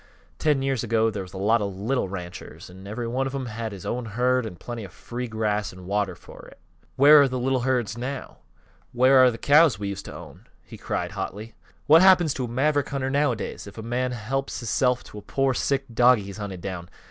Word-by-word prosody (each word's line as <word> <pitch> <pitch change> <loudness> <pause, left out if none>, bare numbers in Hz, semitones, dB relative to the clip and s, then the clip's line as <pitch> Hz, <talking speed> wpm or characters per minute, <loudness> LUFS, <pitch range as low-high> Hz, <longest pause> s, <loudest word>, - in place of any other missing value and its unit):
"Ten 145 -3 +2
years 135 -4 -1
ago 115 -1 +1
there 100 -2 -4
was 90 -1 -10
a - - -7
lot 105 +4 +2
of 100 -2 -3
little 110 +1 -1
ranchers, 90 -1 -8
an' 95 +2 -12
every 115 +3 -4
one 130 +3 -1
of 135 - -5
'em 135 -2 -3
had 115 -1 -5
his 95 -3 -9
own 125 0 -3
herd, 125 +2 0
an' 95 - -8
plenty 120 +6 -7
of 95 - -10
free 125 +1 -6
grass 105 -2 -1
an' 90 0 -12
water 100 -1 -1
fer 90 - -14
it. - - -19 0.4
Where 145 +2 +8
are 140 - +4
th' 130 - -7
little 130 +1 0
herds 120 -4 0
now? 130 +2 -6 0.6
Where 130 +1 +6
are 130 - +7
th' 115 - -6
cows 150 0 +5
that 105 - -11
we 100 - -2
used 100 0 -6
to - - -9
own?" - - -12 0.2
he - - -12
cried, - - -3
hotly. 110 +3 -6 0.3
"What 160 +3 +7
happens 180 -5 +5
to 130 - -3
a - - -6
maverick 140 +4 0
hunter, 135 -1 -2
nowadays? 140 -8 -1
If 100 - -12
a 110 - -6
man 125 +2 -1
helps 130 +4 -3
hisself 125 +1 0
to 105 - -10
a - - -12
pore, 135 +4 0
sick 135 +1 0
dogie 120 -2 +5
he's 100 +1 -9
hunted 100 -4 -6
down! 90 -3 -6
120 Hz, 230 wpm, -25 LUFS, 105-135 Hz, 0.6 s, Where